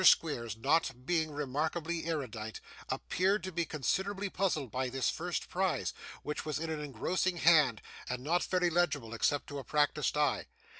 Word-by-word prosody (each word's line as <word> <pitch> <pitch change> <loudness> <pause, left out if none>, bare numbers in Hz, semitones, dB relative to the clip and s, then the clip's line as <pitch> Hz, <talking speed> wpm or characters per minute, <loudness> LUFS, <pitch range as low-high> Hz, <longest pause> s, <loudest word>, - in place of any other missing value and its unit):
Squeers, 115 - +4
not 135 0 +1
being 160 -1 +1
remarkably 155 +4 -2
erudite, 115 -9 -3 0.3
appeared 195 +3 +1
to 185 - -4
be 170 -1 0
considerably 190 +7 -1
puzzled 155 - 0
by 130 0 -1
this 130 0 +1
first 175 +1 -3
prize, 185 -1 0 0.3
which 150 0 -3
was 155 -2 -2
in 160 +1 -3
an 155 - -2
engrossing 175 +7 0
hand, 150 -9 +5 0.3
and 125 0 -3
not 170 +5 +2
very 180 -2 +2
legible 155 -9 +1
except 145 +5 +1
to 145 -1 -5
a - - -6
practised 150 0 +1
eye. 150 -1 +2
155 Hz, 160 wpm, -32 LUFS, 135-175 Hz, 0.3 s, hand